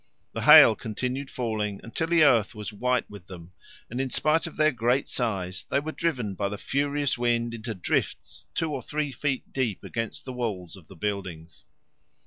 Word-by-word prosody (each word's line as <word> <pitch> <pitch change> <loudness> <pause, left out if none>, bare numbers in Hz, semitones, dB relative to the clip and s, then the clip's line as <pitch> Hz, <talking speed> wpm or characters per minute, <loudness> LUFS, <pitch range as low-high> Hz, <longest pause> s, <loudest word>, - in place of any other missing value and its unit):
The - - -3
hail - - +9
continued 125 +5 -4
falling 110 -4 -2
until 140 +8 -3
the 165 -1 +4
earth 115 -6 +4
was 105 0 -6
white 125 +3 0
with 100 -3 -12
them, 90 -2 -11 0.4
and 125 +3 -3
in 135 - -2
spite 155 +5 +2
of 170 - -10
their 155 0 +4
great 125 +2 +1
size 95 -7 -2
they - - +2
were 155 +2 -4
driven 130 -12 -2
by 100 +1 -2
the 105 - -5
furious 140 +1 -1
wind 120 -1 +1
into 115 -1 -5
drifts 90 - -2
two 160 -2 -1
or 130 - -3
three 150 +3 -3
feet 135 +1 -3
deep 125 -7 -1
against 115 -1 -5
the 130 - -6
walls 105 -9 -4
of 90 -5 -16
the 95 - -13
buildings. 90 -5 -5
120 Hz, 185 wpm, -26 LUFS, 100-135 Hz, 0.4 s, hail